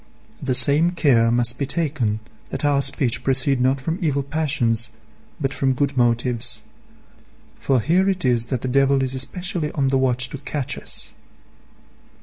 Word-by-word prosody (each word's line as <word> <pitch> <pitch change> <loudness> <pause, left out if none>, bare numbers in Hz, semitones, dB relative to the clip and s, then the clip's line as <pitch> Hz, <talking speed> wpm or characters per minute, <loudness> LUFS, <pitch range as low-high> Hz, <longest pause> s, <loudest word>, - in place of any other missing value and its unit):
The 130 -2 -1
same 155 +7 +5
care 125 -9 +2
must 120 0 +2
be 140 - -2
taken 140 -9 -2 0.3
that - - -4
our 140 -1 +2
speech 135 -3 +3
proceed 135 0 +3
not 130 +2 +1
from 160 +7 -4
evil 140 -4 -1
passions, 135 -6 +1 0.5
but 135 -2 -2
from 135 -1 0
good 140 +1 -2
motives; 120 0 +1 1.0
for 135 -2 0
here 180 - +1
it 185 -6 -3
is 120 -2 +2
that 125 -2 -3
the - - -2
devil 135 +1 +2
is 130 0 0
especially 160 +3 -2
on 135 -2 0
the 135 0 +1
watch 125 -1 +1
to 140 - -7
catch 140 -1 -4
us. - - -5
135 Hz, 160 wpm, -21 LUFS, 125-145 Hz, 1.0 s, same